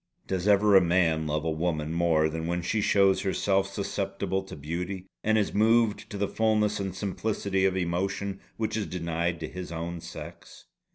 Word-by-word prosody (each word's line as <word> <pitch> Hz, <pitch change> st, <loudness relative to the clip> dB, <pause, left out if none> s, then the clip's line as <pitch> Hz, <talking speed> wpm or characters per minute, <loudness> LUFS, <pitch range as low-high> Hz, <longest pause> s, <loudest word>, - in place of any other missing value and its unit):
Does 95 Hz, 0 st, -2 dB
ever 105 Hz, 0 st, +5 dB
a 95 Hz, -, +9 dB
man 85 Hz, -3 st, +2 dB
love 75 Hz, +1 st, -1 dB
a 80 Hz, -, +1 dB
woman 80 Hz, -1 st, -1 dB
more 85 Hz, -2 st, +3 dB
than 80 Hz, +1 st, -4 dB
when 85 Hz, 0 st, -1 dB
she 105 Hz, +5 st, 0 dB
shows 100 Hz, -2 st, +4 dB
herself 95 Hz, 0 st, +1 dB
susceptible 100 Hz, -1 st, -2 dB
to 95 Hz, -, -10 dB
beauty, 90 Hz, +6 st, -4 dB, 0.2 s
and 110 Hz, 0 st, +3 dB
is 105 Hz, -, 0 dB
moved 110 Hz, 0 st, +3 dB
to 105 Hz, -, -5 dB
the 100 Hz, 0 st, 0 dB
fulness 105 Hz, -1 st, +1 dB
and 95 Hz, -2 st, -3 dB
simplicity 100 Hz, -1 st, -1 dB
of 95 Hz, -1 st, +2 dB
emotion 95 Hz, +2 st, -2 dB, 0.2 s
which 110 Hz, -1 st, -1 dB
is 110 Hz, -2 st, -2 dB
denied 85 Hz, -1 st, -2 dB
to 80 Hz, -, -3 dB
his 90 Hz, 0 st, -7 dB
own 85 Hz, +1 st, -4 dB
sex? 85 Hz, 0 st, -10 dB
95 Hz, 180 wpm, -28 LUFS, 85-100 Hz, 0.2 s, a